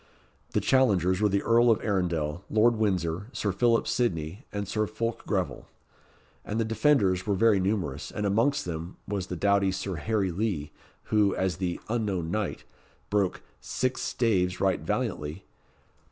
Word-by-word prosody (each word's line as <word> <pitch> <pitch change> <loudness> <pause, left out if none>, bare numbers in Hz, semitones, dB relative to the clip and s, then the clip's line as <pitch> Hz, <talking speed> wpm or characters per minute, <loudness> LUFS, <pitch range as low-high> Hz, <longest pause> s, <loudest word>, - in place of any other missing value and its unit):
The - - +3
challengers 95 -8 +3
were 105 - +4
the 100 0 +1
Earl 120 +1 +4
of 115 - +4
Arundel, 85 -5 -1
Lord 115 +2 +4
Windsor, 95 -3 0
Sir 100 - -1
Philip 115 +4 +2
Sidney, 95 - -1
and 100 -1 -3
Sir 110 +1 0
Fulke 115 +2 -4
Greville; 90 -8 -2 0.8
and 105 +2 -3
the 115 - +1
defenders 110 -6 +2
were 100 - +2
very 105 0 +4
numerous, 95 -7 -1
and 105 - -3
amongst 115 +8 +2
them 85 +1 -5
was 100 -3 -3
the 90 - -4
doughty 100 +1 +2
Sir 95 -1 -3
Harry 100 +3 0
Lee, 85 -6 -2 0.4
who, 105 -2 +4
as 95 -3 -1
the 90 -2 -2
"unknown 100 -8 -1
knight," 105 -1 -2 0.5
broke 100 -3 0 0.2
"six 130 0 -2
staves 95 -6 +1
right 95 -2 +2
valiantly." 75 +6 -3
100 Hz, 155 wpm, -28 LUFS, 90-110 Hz, 0.8 s, were